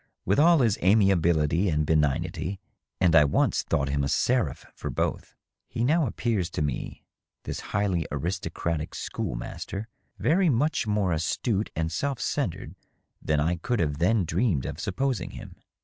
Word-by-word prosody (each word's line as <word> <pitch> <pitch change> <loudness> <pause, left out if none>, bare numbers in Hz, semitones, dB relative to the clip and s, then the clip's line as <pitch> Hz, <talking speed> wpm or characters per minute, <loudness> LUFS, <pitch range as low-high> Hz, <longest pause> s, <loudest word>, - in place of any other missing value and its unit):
With 100 +7 +2
all 165 0 +6
his 115 -5 +2
amiability 90 -3 +3
and 75 -1 +1
benignity 80 +4 0 0.4
(and 90 -3 +4
I 80 - +8
once 70 - +2
thought 70 -1 -1
him 70 0 0
a - - 0
ser 115 - +2
aph - - -12
for - - -6
both), - - -2 0.3
he 115 - -2
now 155 +3 +3
appears 105 -6 -1
to 75 - -1
me, 70 -4 -4 0.4
this - - -4
highly 100 -6 0
aristocratic 80 0 -3
school - - -4
master, 100 - -6 0.3
very 180 +3 +3
much 140 -1 +1
more 105 -3 +1
astute 100 +6 -1
and 80 0 -1
self 135 - -2
centred - - -2 0.5
than 75 -1 +1
I 85 +4 +1
could 120 +7 -1 0.2
then 100 +7 +3
have - - -1
dreamed 85 - 0
of 75 - -5
supposing 125 +7 -1
him. - - -10
90 Hz, 160 wpm, -26 LUFS, 80-115 Hz, 0.5 s, I